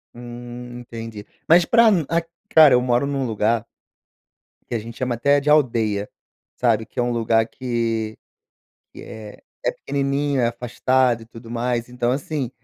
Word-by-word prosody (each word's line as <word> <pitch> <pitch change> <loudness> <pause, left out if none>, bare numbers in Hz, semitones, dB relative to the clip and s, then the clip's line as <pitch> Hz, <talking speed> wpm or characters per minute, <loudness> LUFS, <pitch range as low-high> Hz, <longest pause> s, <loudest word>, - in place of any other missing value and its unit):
Hum, 120 0 -9
entendi. 115 -3 -8 0.2
Mas 170 +2 +6
pra 230 +5 +5
um 185 -7 +3 0.5
Cara, 155 -7 +8
eu 125 - +4
moro 125 +1 +1
num 140 -2 -1
lugar 110 0 0 1.1
que 120 - 0
a - - -1
gente 115 +1 -9
chama 125 -2 -1
até 140 +4 +3
de 145 +1 0
aldeia, 115 -8 +2 0.5
sabe? 115 -3 +1
Que 115 - -4
é - - +2
lugar 115 -2 +2
que 115 -3 -2 0.8
que - - -11
é 110 -2 -10 0.2
é - - +1
pequenininho, 140 0 -1
é 120 - +3
afastado 125 0 +1
e - - -13
tudo 115 0 -12
mais, 120 0 -2
então, 125 0 -1
assim, 140 -2 -3
120 Hz, 155 wpm, -22 LUFS, 115-135 Hz, 1.1 s, Cara